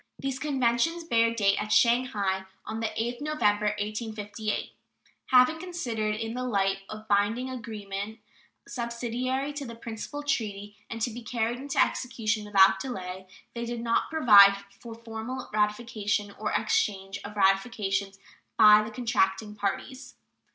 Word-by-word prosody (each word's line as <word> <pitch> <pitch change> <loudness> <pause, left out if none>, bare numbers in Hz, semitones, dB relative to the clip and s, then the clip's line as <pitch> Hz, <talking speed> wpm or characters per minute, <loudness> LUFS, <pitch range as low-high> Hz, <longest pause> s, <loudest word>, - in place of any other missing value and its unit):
These 270 -1 -3
conventions 280 +4 +1
bear 230 -7 +2
date 200 -4 +2
at 210 0 -5
Shanghai 210 -6 +2 0.2
on 220 +1 -4
the 225 - 0
8th 240 +4 -3
November, 210 -9 +1
1858. 215 0 -4 0.6
Having 255 +5 +5
been - - -9
considered 235 -12 -2
in 225 +1 -4
the 250 +1 -3
light 195 -5 +1
of 215 0 -9
binding 220 +6 +1
agreements 215 -3 -6 0.5
subsidiary 250 +3 -3
to 290 0 -5
the 235 -3 -8
principal 230 +5 -7
treaty, 205 -7 -2
and 230 -1 -4
to 240 - 0
be 240 +2 -8
carried 235 +1 -2
into 280 +1 -5
execution 220 -3 0
without 195 -1 +5
delay, 190 -6 -6 0.3
they 235 - -4
do 235 0 -4
not 230 0 0
provide 205 -10 +7 0.2
for 230 -2 -9
any 230 - -20
formal 230 +3 -6
ratification 210 -1 0
or - - -2
exchange 195 - 0
of 210 +1 -8
ratifications 195 0 +1 0.4
by 210 -1 +8
the 215 - -5
contracting 215 -3 0
parties. 210 +6 -4
225 Hz, 145 wpm, -27 LUFS, 205-245 Hz, 0.6 s, by